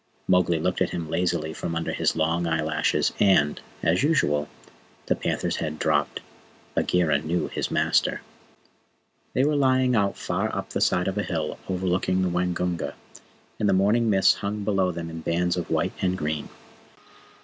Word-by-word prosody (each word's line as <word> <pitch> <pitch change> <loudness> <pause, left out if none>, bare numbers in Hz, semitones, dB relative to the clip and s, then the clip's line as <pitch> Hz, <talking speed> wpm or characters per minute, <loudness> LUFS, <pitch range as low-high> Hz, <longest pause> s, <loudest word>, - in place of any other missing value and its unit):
Mowgli 90 -2 +3
looked 90 +3 -1
at - - +2
him 80 -2 -5
lazily 85 -2 0
from 85 - -4
under 85 - -2
his - - 0
long 80 +2 0
eyelashes, 80 -1 +1
and, 75 -8 +3 0.2
as 85 +2 +2
usual, 140 - +1 0.6
the - - +1
panther's - - -2
head 75 -1 -3
dropped. 75 -2 0 0.5
Bagheera 80 -5 +2
knew 80 +4 -2
his - - -3
master. - - +1 1.1
They 130 - +3
were 150 0 +2
lying 130 -2 +3
out 100 -3 +1
far - - -2
up - - -5
the - - -2
side 90 - +2
of 95 +2 -1
a - - 0
hill 80 -5 -3
overlooking 90 0 0
the 90 - +1
Waingunga, 90 -3 -1 0.6
and 105 - +2
the - - +4
morning 105 +5 +3
mists 95 -2 +5
hung 105 +1 -4
below 95 -3 +1
them 85 -1 -5
in 80 0 -7
bands 85 +2 0
of 90 - -4
white - - 0
and 95 0 +1
green. 75 -3 -3
90 Hz, 165 wpm, -25 LUFS, 80-95 Hz, 1.1 s, mists